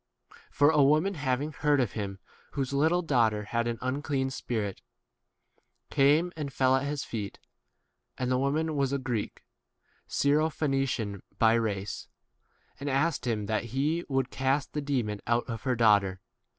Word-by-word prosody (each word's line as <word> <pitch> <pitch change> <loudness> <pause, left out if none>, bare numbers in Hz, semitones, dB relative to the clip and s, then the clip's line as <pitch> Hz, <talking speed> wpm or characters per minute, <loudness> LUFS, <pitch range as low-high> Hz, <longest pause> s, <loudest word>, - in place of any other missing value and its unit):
For 145 +2 +4
a 150 -2 +4
woman 155 +8 +4
having 140 -1 -1
heard 145 -1 +2
of 120 -7 +1
him, 100 -3 -4 0.4
whose 135 -1 -2
little 160 +6 +2
daugh 125 -8 +3
ter 105 -1 -4
had 115 +2 -1
an 120 -1 -2
unclean 135 0 -1
spirit, 110 -6 -3 1.1
came 150 +6 +4
26 160 - -8
and 140 -2 -3
fell 130 0 +3
at 135 +2 0
his 145 -1 -2
feet 105 -4 -5 0.8
(and 125 0 -1
the 125 - +2
wo 140 +1 +2
man 155 +2 -1
was 140 -2 +1
a 140 - +1
Greek, 125 -5 -3 0.7
Syrophenician 135 - 0 0.2
by 115 -1 +5
race), 105 -3 -2 0.7
and 140 +1 -3
asked 140 0 0
him 110 -3 -1
that 110 +2 -1
he 145 +8 0
would 135 -2 0
cast 135 +1 0
the 150 - -1
demon 120 -8 -1
out 120 +1 +1
of 115 -1 -6
her 130 -2 +2
2? - - -9
daughter. 100 -4 +3
130 Hz, 165 wpm, -29 LUFS, 115-145 Hz, 1.1 s, by